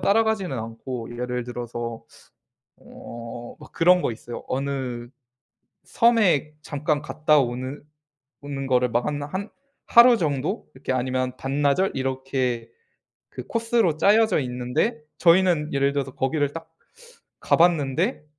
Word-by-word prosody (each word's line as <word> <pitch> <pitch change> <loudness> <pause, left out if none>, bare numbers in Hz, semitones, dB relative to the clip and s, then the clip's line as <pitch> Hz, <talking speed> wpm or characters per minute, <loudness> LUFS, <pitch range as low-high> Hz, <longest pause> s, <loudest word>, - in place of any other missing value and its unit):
따라가지는 210 - +1
않고 115 +1 -6
예를 125 -1 -2
들어서 120 -1 -6 0.7
어 120 0 -10
막 - - -14
그런 180 +1 +4
거 - - 0
있어요. 120 +1 -9
어느 130 -3 -3 0.8
섬에 210 - +3
잠깐 150 0 -1
갔다 150 0 +2
오는 130 +2 -3 0.6
오는 140 -1 -5
거를 125 -1 +2
막 120 +1 0
하나 145 -1 -3
한 190 +6 -5 0.4
하루 235 0 +7
정도 150 - -2
이렇게 130 0 -4
아니면 130 0 -1
반나절 145 +7 +1
이렇게 130 -3 -2 0.6
그 125 - -8
코스로 230 -8 +1
짜여져 210 +2 +4
있는데 125 - -1 0.2
저희는 170 -3 +4
예를 140 0 +2
들어서 135 -2 -2
거기를 140 +2 0
딱 165 0 -8 0.7
가 - - +3
봤는데 165 - +2
140 Hz, 260 characters per minute, -24 LUFS, 125-170 Hz, 0.8 s, 하루